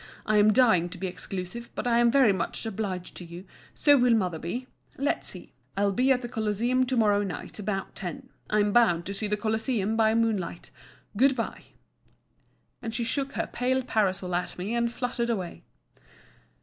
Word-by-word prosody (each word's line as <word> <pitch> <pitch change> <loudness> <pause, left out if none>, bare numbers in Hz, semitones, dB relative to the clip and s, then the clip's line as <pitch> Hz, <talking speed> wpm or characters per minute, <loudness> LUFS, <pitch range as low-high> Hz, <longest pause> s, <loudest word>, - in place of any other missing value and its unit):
I'm 215 0 +5
dying 210 -8 +4
to 180 - -9
be 190 - -4
exclusive; 185 +5 -5
but - - -3
I'm 235 0 +4
very 250 -4 +5
much 185 +4 -3
obliged 195 -4 -4
to - - -7
you, 170 +1 -9
and 190 - -19 0.3
so 290 -2 +5
will 245 -1 +5
mother 180 -7 0
be. 235 +11 -4 0.3
Let's 280 +3 -1
see. - - -10 0.2
I'll 200 0 +2
be 255 +6 +2
at 250 -1 +2
the - - -3
Colosseum 235 +3 0
to 255 0 0
morrow 205 -2 +4
night, 200 +1 -5
about 195 -2 -3
ten. 175 -5 -7 0.2
I'm 210 -1 +2
bound 175 -9 +4
to 200 - -4
see 210 +2 -1
the 210 0 0
Colosseum, 220 0 0
by 220 0 +3
moonlight. 220 -7 -1 0.4
Good 265 +5 +4
bye;" 230 - -4 1.2
and 225 -1 -5
she 240 - -1
shook 275 +4 -2
her - - -1
pale 260 +1 0
parasol 190 -5 0
at 175 +1 -2
me, 190 +5 -3
and 235 0 +1
fluttered 240 -1 -2
away. 180 - -3
220 Hz, 180 wpm, -27 LUFS, 190-240 Hz, 1.2 s, I'm